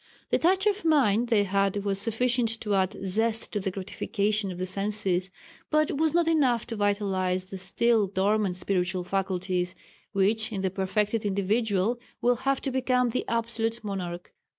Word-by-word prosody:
The - - +3
touch 375 +4 +3
of 415 0 +1
mind 245 -8 +3
they 215 -4 +4
had 200 +1 0
was 195 -1 -1
sufficient 230 +1 +1
to 210 -2 -1
add 190 +1 +1
zest 220 +4 0
to 210 - -1
the 190 - -2
gratification 200 +1 -2
of 180 - -7
the 185 - -2
senses, 190 -1 -1 0.4
but 305 0 +2
was 320 -1 +3
not 340 +1 +2
enough 265 -8 +2
to 230 - -5
vitalize 195 -3 0
the 190 0 -8
still 210 +3 +2
dormant 195 0 +1
spiritual 180 -1 -1
faculties, 185 -1 -1 0.4
which 215 +3 +2
in 195 -3 -3
the 190 - 0
perfected 210 +3 0
individual 205 +2 0 0.2
will 245 0 +2
have 270 +2 0
to 270 - -2
become 250 -1 +1
the 255 - -2
absolute 230 -1 -2
monarch. 180 -4 -5
205 Hz, 165 wpm, -27 LUFS, 190-235 Hz, 0.4 s, they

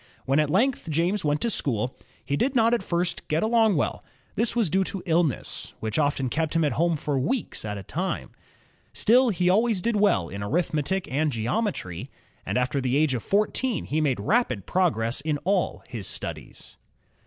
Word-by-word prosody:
When 135 +3 +2
at 150 -1 +2
length 225 - +1
James 170 +6 +1
went 150 0 +1
to 235 - +1
school, 125 - -1 0.3
he 140 - 0
did 260 - 0
not 230 -1 +4
at 240 - +2
first 175 -1 -2
get 155 0 +1
along 220 -2 +3
well. 145 - -1 0.3
This 230 +3 0
was 230 -5 +2
due 190 +2 +3
to 190 -1 -5
illness, 165 - -1
which 110 +7 -2
often 145 -3 +1
kept 160 +5 -1
him 165 - +3
at 150 - +2
home 170 +1 +1
for 145 -2 -1
weeks 210 - -2
at 105 -1 -3
a 100 - -7
time. 180 - -3 0.6
Still, 245 +3 +4
he 180 -4 0
al 190 +4 +5
ways 230 -5 +1
did 230 +5 0
well 200 - +3
in 100 +3 -7
arithmetic 155 - -1
and 150 +3 +1
geometry, 115 - -2 0.4
and - - 0
after 125 +2 0
the 130 +1 +1
age 155 -2 +2
of 120 - -2
fourteen 215 - 0
he 155 +2 0
made 135 -7 +1
rapid 130 - +1
progress 135 -11 +1
in 150 0 -1
all 195 -1 0
his 115 -7 -6
studies. - - -8
160 Hz, 190 wpm, -26 LUFS, 135-205 Hz, 0.6 s, al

